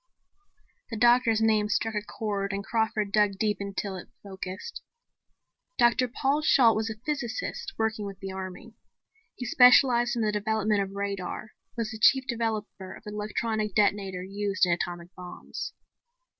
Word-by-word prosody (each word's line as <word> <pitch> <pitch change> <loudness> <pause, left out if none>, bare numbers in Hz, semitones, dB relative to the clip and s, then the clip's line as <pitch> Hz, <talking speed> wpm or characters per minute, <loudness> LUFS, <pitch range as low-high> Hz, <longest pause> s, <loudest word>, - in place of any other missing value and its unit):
The 225 - -5
doctor's 240 -1 +4
name 215 -2 +3
struck 225 +1 0
a 210 - -1
chord 200 -2 -3
and 200 0 -3
Crawford 220 -1 -1
dug 210 -1 +3
deep 210 -1 0
until 200 -1 -4
it 180 - -10
focused. 190 - -7 1.0
Dr. 240 +1 +4
Paul 275 +4 0
Shalt 250 -6 +5
was 220 +1 -1
a 220 - -6
physicist 300 - -3
working 220 -2 -1
with 195 -1 -9
the 195 -1 -6
army. 190 +4 -7 0.6
He 250 - -6
specialized 245 0 +5
in 235 - 0
the 210 - +1
development 210 0 0
of 195 0 -5
radar, 200 +1 -4 0.3
was 230 -1 -2
the 220 - -7
chief 265 +4 +5
developer 220 -5 -3
of - - -15
the 210 - -7
electrical 215 +1 -2
detonator 200 -3 +1
used 200 +1 0
in 175 - 0
atomic 175 0 -4
bombs. 180 -1 -7
215 Hz, 155 wpm, -27 LUFS, 200-230 Hz, 1.0 s, Shalt